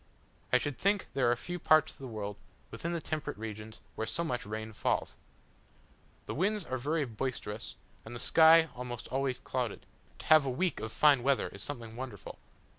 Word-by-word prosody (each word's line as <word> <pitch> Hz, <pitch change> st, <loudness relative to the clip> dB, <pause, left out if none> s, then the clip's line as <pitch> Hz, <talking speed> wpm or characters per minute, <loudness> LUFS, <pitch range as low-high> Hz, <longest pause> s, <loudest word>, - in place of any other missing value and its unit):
I 125 Hz, -, +7 dB
should 135 Hz, -1 st, -3 dB
think 200 Hz, 0 st, +2 dB
there 135 Hz, -3 st, +3 dB
are -, -, +3 dB
few 175 Hz, +8 st, -5 dB
parts 155 Hz, -1 st, +5 dB
of -, -, -21 dB
the 135 Hz, -, -6 dB
world, 105 Hz, -3 st, -4 dB, 0.4 s
within 170 Hz, -, -4 dB
the 170 Hz, -, -1 dB
temperate 155 Hz, -7 st, -3 dB
regions, 110 Hz, 0 st, -7 dB
where 110 Hz, -, -3 dB
so 170 Hz, -, -1 dB
much 125 Hz, -9 st, -3 dB
rain 110 Hz, +1 st, -5 dB
falls. -, -, -1 dB, 1.1 s
The -, -, -4 dB
winds 200 Hz, +3 st, 0 dB
are 130 Hz, -1 st, -3 dB
very 150 Hz, +4 st, 0 dB
boisterous, 115 Hz, -2 st, -4 dB, 0.3 s
and 115 Hz, +2 st, -9 dB
the -, -, -5 dB
sky 160 Hz, +2 st, +6 dB
almost 125 Hz, -1 st, -6 dB
always 135 Hz, -1 st, 0 dB
clouded: 125 Hz, -5 st, -3 dB, 0.3 s
to -, -, -11 dB
have 155 Hz, -1 st, +7 dB
a 135 Hz, -, -1 dB
week 175 Hz, +8 st, 0 dB
of 110 Hz, +1 st, -4 dB
fine 145 Hz, -2 st, +5 dB
weather 135 Hz, +2 st, +2 dB
is -, -, -10 dB
something 115 Hz, -5 st, -6 dB
wonderful. 120 Hz, -6 st, -7 dB
130 Hz, 190 wpm, -31 LUFS, 110-155 Hz, 1.1 s, I